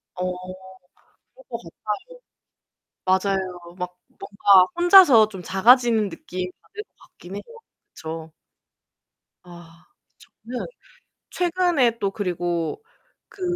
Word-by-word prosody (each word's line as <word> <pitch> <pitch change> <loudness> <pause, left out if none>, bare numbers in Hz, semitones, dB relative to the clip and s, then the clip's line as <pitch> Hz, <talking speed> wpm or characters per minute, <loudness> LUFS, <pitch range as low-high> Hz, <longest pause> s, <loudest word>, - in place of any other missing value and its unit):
어. 180 0 -2 1.0
그럴 - - -18
것 - - -5 1.5
같아요. 190 +1 +1
맞아요. 175 -2 -8
막 180 -1 -6
뭔가 195 -1 +3
혼자서 345 - +7
좀 190 -4 -9
작아지는 225 +2 +4
느낌 180 +1 -6
받을 420 -1 -9
것 - - -59 0.3
같긴 180 +3 -9
해요. 205 - -6 0.5
그쵸? 160 0 -8 1.1
아 170 -1 -15 0.3
저는 245 +2 -9 0.6
최근에 345 -9 +1
또 200 -1 -1
그리고 175 - -3 0.5
그 395 - -16
195 Hz, 190 characters per minute, -23 LUFS, 180-245 Hz, 1.5 s, 혼자서